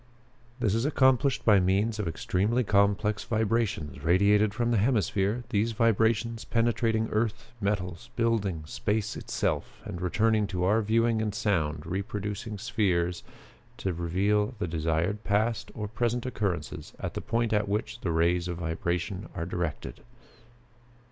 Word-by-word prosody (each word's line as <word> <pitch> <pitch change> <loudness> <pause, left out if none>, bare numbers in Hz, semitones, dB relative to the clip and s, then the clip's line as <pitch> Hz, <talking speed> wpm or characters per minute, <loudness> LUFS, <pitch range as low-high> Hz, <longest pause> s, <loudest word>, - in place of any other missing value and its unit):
This 110 -6 +1
is 115 +1 +1
accomplished 130 -2 +3
by 105 -3 +6
means 100 +4 +1
of 105 - -1
extremely 105 +8 0
complex 100 0 +2
vibrations 110 - -1
radiated 100 +5 +4
from 120 +3 -1
the 115 - +3
hemisphere, 105 0 +1
these 115 0 +1
vibrations 115 +1 +2
penetrating 115 -1 +1
earth, 110 0 -1
metals, 100 +1 -2
buildings, 100 -10 0
space 105 +1 -1
itself, - - -2
and 90 - -6
returning 105 +3 +2
to 90 -3 -2
our 105 +5 +3
viewing 115 +1 +2
and 105 -2 -2
sound 80 -8 0
reproducing 100 +4 -4
spheres 95 -6 0 0.6
to 95 - -2
reveal 100 +7 0
the 90 - -2
desired 85 +6 -1
past 110 +2 0
or 105 -1 -3
present 120 +3 -1
occurrences 105 -8 -3
at - - -4
the - - -4
point 115 -1 0
at 105 -1 +1
which 105 +3 -2
the 90 - -2
rays 85 +2 +2
of 90 -1 -3
vibrations 85 +3 -2
are 85 -3 -3
directed. 85 -3 -4
105 Hz, 140 wpm, -28 LUFS, 90-115 Hz, 0.6 s, by